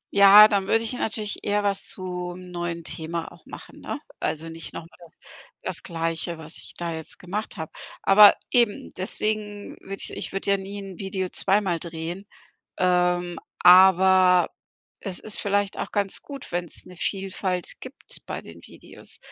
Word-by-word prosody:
Ja, 200 +1 +10
dann 200 -3 0
würde 225 +2 +2
ich 230 - -3
natürlich 220 -3 -3
eher 205 0 +1
was 200 -1 -1
zum 180 -1 -6
neuen 175 -1 -4
Thema 165 +1 -5
auch - - -18
machen, - - -11
ne? - - -5 0.2
Also, 160 +1 -2
nicht 165 -1 -7
noch - - -6
mal - - -22
das 170 -1 -17 0.5
das - - -3
Gleiche, 165 0 -3
was 160 0 -8
ich - - -10
da 170 -1 -3
jetzt 160 -1 -6
gemacht 200 +4 -5
habe. 160 -2 -6 0.3
Aber 205 +1 +8 0.2
eben, 235 -4 +2
deswegen 210 +2 -2
würde 195 - -6
ich - - -4
Ich - - -5
würde 195 +1 -1
ja 200 - +4
nie 200 +1 -7 0.2
Video 190 -1 -3
zweimal 190 -3 +1
drehen, 170 +4 -6 0.5
ähm, 180 -1 +1 0.2
aber 185 0 +7 0.5
es 190 -4 -5
ist 215 - -2
vielleicht 205 -1 0
auch - - -4
ganz 200 -2 -1
gut, 280 -2 -9
wenn's 175 -1 -5
'ne 180 - -13
Vielfalt 190 -1 -3
gibt - - -8
bei - - -5
den 85 0 -13
Videos. - - -10
185 Hz, 165 wpm, -25 LUFS, 175-200 Hz, 0.5 s, Ja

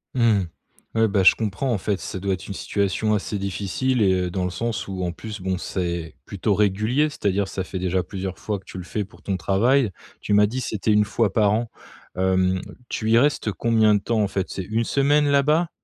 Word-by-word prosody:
Mmh. 110 -6 +3 0.5
Ouais 110 0 +4
bah, 100 -1 +1
je 95 - +7
comprends 110 +4 -2
en 115 - +1
fait 100 0 -2
ça - - -5
doit 100 +1 -1
être 90 - -6
une 100 - -5
situation 100 +2 0
assez 105 0 -1
difficile 100 +6 -1
et 95 - +4
heu, 90 -1 -1
dans 95 -1 -2
le 90 - 0
sens 115 +4 -3
où 95 -1 -4
en 90 - -1
plus 105 +4 -8
bon, 95 0 -2
c'est 85 -3 -3
plutôt - - -1
régulier. 110 +9 +2
C'est-à-dire, 100 -7 -1
ça 95 - -4
fait 95 - -6
déjà 95 0 0
plusieurs 95 +1 -6
fois 105 -2 -2
que - - -23
tu 95 - -8
le - - -6
fais 105 +4 -3
pour 100 - -19
ton 95 -2 -2
travail, 110 - +2 0.3
tu 105 - -2
m'as 105 0 +6
dit 125 +5 -3
c'était 110 -2 -1
1 105 0 +4
fois 105 -1 +1
par 105 -2 +3
an, 115 +1 -1 0.5
hem, 95 0 +2 0.3
tu 110 0 -1
y 115 - +6
restes 135 -5 +1
combien 110 +2 +3
de 105 - +3
temps 115 -1 0
en - - +1
fait, 95 -1 -3
c'est 95 - -4
1 110 +5 -1
semaine 145 +4 +2
là-bas? 150 +4 +3
105 Hz, 225 wpm, -23 LUFS, 95-115 Hz, 0.5 s, je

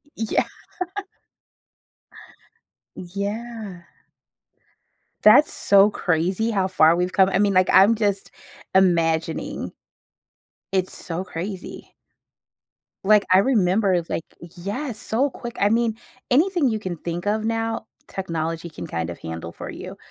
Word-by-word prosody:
Y 225 - -2
Yeah. - - +2 2.5
Yeah. 200 +1 -5 1.4
That's 250 +8 +7
so 200 +1 +5
crazy 185 +4 0
how 195 -3 +1
far 165 -3 +4
we've 180 +1 -1
come, 190 -1 +5
I 195 - +1
mean, 205 -1 +3
like, 185 0 +3
I'm 205 +4 +6
just 205 -3 -1 0.5
imagining. 165 -3 +1 1.0
It's 190 -1 0
so 175 +1 -4
crazy. 185 +2 -7 1.1
Like, 210 +1 +5
I 185 - +7
remember, 195 -5 +2
like 165 - -3 0.3
yes, 215 - -4
so 250 +7 0
quick, 240 -2 -8
I 200 - +3
mean, 225 0 +1 0.3
anything 325 +1 +3
you 220 -2 -1
can 185 -4 -4
think 170 +3 -5
of 215 +1 0
now, 225 0 -2 0.2
technology 165 -2 -4
can 155 - -8
kind 85 0 -3
of 85 - -6
handle 80 0 -6
for - - -8
you, - - -8
195 Hz, 120 wpm, -23 LUFS, 175-220 Hz, 2.5 s, That's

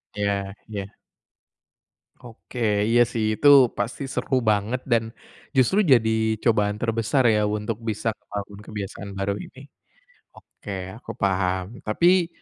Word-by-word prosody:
Iya 100 -1 -1
iya. 100 -2 -6 1.3
Oke. 120 0 -11 0.3
Iya 120 +1 +5
sih, 115 -2 -2
itu 145 - +4 0.3
pasti 125 +4 -3
seru 130 -1 -1
banget 110 +3 +1
dan 115 -3 +1 0.5
justru 130 - +3
jadi 110 -2 +3
cobaan 105 -3 +2
terbesar 115 +3 +1
ya, 105 -1 +2
untuk 105 +1 -2
bisa 115 0 -2 0.2
bangun 100 0 -6
kebiasaan 100 -1 -7
baru 95 +1 -1
ini. 135 +8 -12 0.7
Oke, 95 -2 -8
aku 115 - -11
paham. 95 +2 -1
Tapi, 175 +10 +3
110 Hz, 120 wpm, -24 LUFS, 100-120 Hz, 1.3 s, Iya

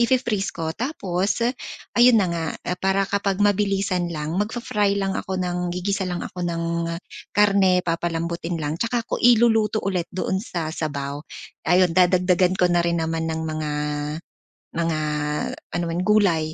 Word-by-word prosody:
i-fi-freeze 235 -4 +1
ko. 160 -1 -3
Tapos, 200 - -1 0.6
ayun 240 -1 +7
na - - +1
nga, 165 -1 -2 0.2
ah, 180 0 -2
para 195 +1 +2
kapag 200 -1 0
mabilisan 195 -3 +1
lang, 155 +3 -3
mag-fa-fry 210 -2 0
lang 195 -1 0
ako 190 0 -3
ng 180 0 -2
gigisa 190 +1 -1
lang 175 -1 -3
ako 180 -1 -4
ng, 170 -1 -2 0.7
karne, 195 -3 +4
papalambutin 170 0 -2
lang, 155 +2 -3
tsaka 235 0 0
ko - - -2
iluluto 225 -2 +4
ulit 180 -4 -1
doon 190 +1 -1
sa 170 -8 -4
sabaw. 145 -3 -3 0.5
Ayun, 180 +1 +4
dadagdagan 180 0 +3
ko 180 -1 +3
na 175 - +3
rin 170 0 0
naman 160 0 -1
ng 160 0 -2
mga 155 -1 -3 1.1
mga 165 -2 0 0.7
ano 175 - -1
man, 170 +2 -1
gulay. 175 -7 +3
180 Hz, 150 wpm, -23 LUFS, 165-200 Hz, 1.1 s, ayun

